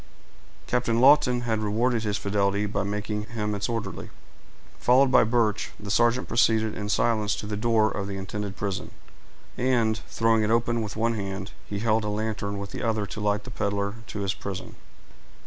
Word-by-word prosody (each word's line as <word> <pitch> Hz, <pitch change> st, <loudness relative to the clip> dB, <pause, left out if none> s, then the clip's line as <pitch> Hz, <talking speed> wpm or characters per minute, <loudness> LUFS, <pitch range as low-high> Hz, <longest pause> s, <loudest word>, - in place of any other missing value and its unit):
Captain 120 Hz, -2 st, +1 dB
Lawton 130 Hz, -2 st, +5 dB
had 115 Hz, -2 st, -1 dB
rewarded 115 Hz, +3 st, +1 dB
his 105 Hz, -1 st, -1 dB
fidelity 100 Hz, 0 st, 0 dB
by 100 Hz, -1 st, -1 dB
making 105 Hz, +1 st, -3 dB
him 105 Hz, -2 st, -3 dB
its 100 Hz, +1 st, -2 dB
orderly. 115 Hz, -4 st, -4 dB, 0.7 s
Followed 130 Hz, +2 st, +4 dB
by -, -, +6 dB
Birch, 110 Hz, -2 st, 0 dB
the 100 Hz, -1 st, -5 dB
sergeant 120 Hz, +3 st, +3 dB
proceeded 110 Hz, -2 st, +2 dB
in 105 Hz, 0 st, -4 dB
silence 105 Hz, 0 st, +1 dB
to -, -, -6 dB
the 105 Hz, 0 st, -3 dB
door 110 Hz, 0 st, +2 dB
of 100 Hz, -1 st, -3 dB
the 100 Hz, -1 st, -4 dB
intended 100 Hz, +1 st, -5 dB
prison, 100 Hz, -2 st, -3 dB, 0.7 s
and, 115 Hz, -3 st, +2 dB
throwing 115 Hz, -1 st, +2 dB
it 105 Hz, -, +1 dB
open 115 Hz, 0 st, +2 dB
with 105 Hz, -2 st, -5 dB
one 115 Hz, +1 st, +1 dB
hand, 100 Hz, -1 st, -4 dB, 0.2 s
he 100 Hz, -, -4 dB
held 110 Hz, +1 st, +1 dB
a 105 Hz, -, -2 dB
lantern 105 Hz, -1 st, -2 dB
with 100 Hz, 0 st, -6 dB
the -, -, -5 dB
other 110 Hz, -2 st, 0 dB
to 105 Hz, +1 st, -7 dB
light 105 Hz, 0 st, 0 dB
the -, -, -9 dB
peddler 100 Hz, 0 st, -1 dB
to 105 Hz, -, -5 dB
his 100 Hz, 0 st, 0 dB
prison. 95 Hz, -2 st, -7 dB
105 Hz, 180 wpm, -26 LUFS, 100-115 Hz, 0.7 s, by